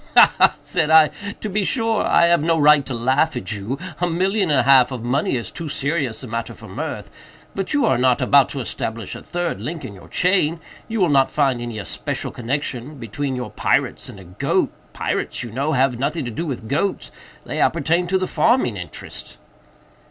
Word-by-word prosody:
"Ha! - - +8
ha!" - - +5
said 155 - -1
I, 160 -1 +7 0.3
"to - - -3
be 205 0 0
sure 225 0 +1
I - - +4
have 170 -2 +3
no 165 +1 +2
right 150 -1 +6
to 135 - -3
laugh 130 +7 +1
at 125 - -3
you—a 145 - -4
million 190 +3 +1
and 140 -3 +4
a - - -2
half 130 0 +5
of 125 -3 -5
money 135 +3 0
is 120 - -3
too 165 -3 -6
serious 140 -4 -2
a - - -6
matter 115 +1 -4
for - - -12
mirth—but 195 -1 -7
you 290 - +3
are - - +2
not 125 -1 +3
about 140 -2 +4
to 140 - -5
establish 115 -2 -4
a - - -8
third 175 -1 -3
link 160 0 -5
in 100 - -7
your 95 - -14
chain—you 180 +4 -1
will 180 -3 +3
not 135 -2 +4
find 135 -5 +1
any 120 -2 -5
especial 100 - -4
connexion 130 +2 -3
between 130 +3 -4
your 125 -1 -5
pirates - - 0
and 100 - -11
a - - -11
goat—pirates, 90 +6 -2
you 120 - -7
know, 140 +7 -1
have 125 -2 +2
nothing 150 +2 -1
to 120 - -4
do 165 +9 -4
with 125 -6 -5
goats; 170 - -1 0.3
they - - -4
appertain 170 +2 +2
to 190 +2 +2
the 185 0 -1
farming 235 - +2
interest." 90 -1 -7
140 Hz, 195 wpm, -21 LUFS, 125-170 Hz, 0.3 s, Ha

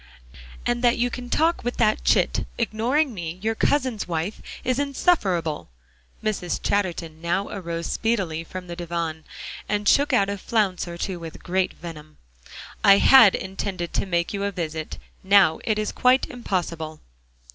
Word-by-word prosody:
"And 240 0 0
that 240 0 +4
you 245 +1 +1
can 245 0 -6
talk 330 +5 +1
with 245 +1 -3
that 215 -2 +2
chit, - - +2
ignoring 240 +6 +1
me, 170 -3 -5
your 225 +1 +1
cousin's 255 -2 0
wife, 170 +4 -3 0.2
is 255 +1 0
insufferable." 200 - 0 0.5
Mrs. 205 -5 -1
Chatterton 170 -5 -1
now 175 +4 -1
arose 170 -3 -4
speedily 190 -9 -1
from 185 +2 -8
the 175 -1 -7
divan, 170 -2 -4 0.4
and 205 0 -1
shook 285 +6 +4
out 200 -6 +3
a 200 0 -3
flounce 195 -4 0
or 170 0 -7
two 180 0 -3
with 165 -1 -9
great 185 +1 0
venom. 155 -2 -10 0.7
"I 200 0 +8
had 230 -3 +7
intended 190 -2 -4
to - - -1
make 170 0 0
you 200 0 -2
a 200 - 0
visit. 160 -4 -4 0.3
Now 190 -4 +5
it 215 -2 +1
is 215 -1 -1
quite 255 +1 +3
impossible." 170 -9 -3
195 Hz, 155 wpm, -24 LUFS, 170-230 Hz, 0.7 s, I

